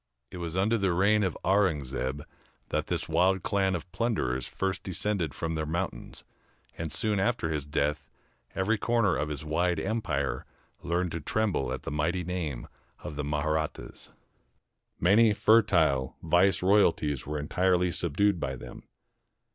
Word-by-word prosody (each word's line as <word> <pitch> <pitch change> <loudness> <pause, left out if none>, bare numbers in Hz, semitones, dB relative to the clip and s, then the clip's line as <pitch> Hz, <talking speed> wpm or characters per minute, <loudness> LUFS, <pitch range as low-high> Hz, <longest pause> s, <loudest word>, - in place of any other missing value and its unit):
It - - -7
was 85 0 -4
under 110 +4 +2
the 95 -3 +1
reign 100 +4 +3
of 95 -3 -1
Aurungzebe 75 -8 0 0.5
that - - -1
this - - -2
wild 95 0 +2
clan 95 -3 +1
of 90 +1 -7
plunderers 95 - -1
first 95 -1 -2
descended 95 -5 -2
from 80 0 -3
their 80 -1 -2
mountains; 85 +4 -4 0.5
and 80 -2 -5
soon 105 -3 0
after 95 -6 0
his 75 -2 -3
death, 75 0 -1 0.5
every 105 +3 +1
corner 115 -6 +2
of 75 - -2
his 75 0 -5
wide 85 +2 +1
empire 95 -9 -2 0.4
learned 90 0 -1
to 85 - -3
tremble 100 -2 0
at - - -4
the - - -5
mighty 85 +5 0
name 80 -8 -4 0.4
of 75 - -6
the 75 - -3
Mahrattas. 75 +1 -3 0.9
Many 105 +5 +5
fertile 85 - +3
vice 90 +4 +3
royalties 85 -9 +2
were 75 +1 -2
entirely 90 +4 +1
subdued 90 +4 +1
by 65 -2 -3
them. 65 -1 -10
85 Hz, 145 wpm, -28 LUFS, 75-95 Hz, 0.9 s, Many